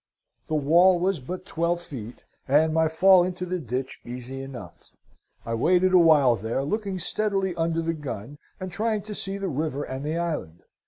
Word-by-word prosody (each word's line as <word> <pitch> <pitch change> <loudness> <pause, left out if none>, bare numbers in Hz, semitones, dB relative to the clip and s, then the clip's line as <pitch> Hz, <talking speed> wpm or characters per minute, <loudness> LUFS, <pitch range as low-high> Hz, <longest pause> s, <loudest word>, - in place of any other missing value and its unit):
"The 155 - -1
wall 170 +5 +5
was 185 -1 0
but 180 +8 -7
twelve 170 +1 -1
feet, 125 -9 -9 0.2
and 155 +3 +3
my 160 0 +3
fall 180 +3 +5
into 180 0 -3
the 180 0 -3
ditch 130 -2 -4
easy 125 +2 -7
enough. 125 - -10 0.6
I 115 - -3
waited 180 +10 +3
a 180 - +8
while 150 -7 +5
there, 115 +6 -2
looking 200 +5 -2
steadily 195 0 0
under 165 0 -1
the 165 0 -1
gun, 140 -2 -7 0.2
and 185 0 -6
trying 215 +1 -1
to 215 0 -7
see 195 -1 -1
the 195 -1 -3
river 145 -2 -2
and 130 0 -6
the 155 +3 -2
island. 155 - -4
165 Hz, 180 wpm, -25 LUFS, 135-185 Hz, 0.6 s, a